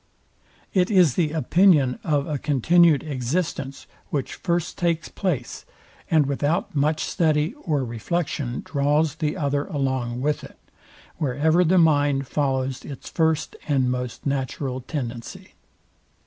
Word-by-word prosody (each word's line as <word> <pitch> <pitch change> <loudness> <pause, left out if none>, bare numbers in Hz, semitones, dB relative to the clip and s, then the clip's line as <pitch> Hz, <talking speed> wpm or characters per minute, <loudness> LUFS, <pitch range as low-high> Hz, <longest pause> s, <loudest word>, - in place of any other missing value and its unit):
It 185 -1 +3
is 180 - +5
the 160 -4 +1
opinion 155 -3 +3
of 145 -3 +1
a 150 -3 -3
continued 155 +3 +4
existence, 140 0 -3 0.2
which 140 -3 -2
first 170 -2 -2
takes 170 -2 -1
place, 150 - -3 0.5
and 155 -3 +4
without 145 +4 -1
much 150 +2 +1
study 155 +2 +1
or 155 - -2
reflection 125 +1 -3
draws 145 +1 +1
the 150 -1 -2
other 145 -1 0
along 130 -7 -2
with 145 +3 -1
it, - - -12 0.6
wherever 155 +4 +2
the 180 +2 +3
mind 145 -4 +3
follows 135 -2 -1
its 140 - -9
first 160 -2 0
and 135 -4 +2
most 125 -1 -4
natural 135 -1 -2
tendency. 120 -3 -6
145 Hz, 125 wpm, -24 LUFS, 135-160 Hz, 0.6 s, is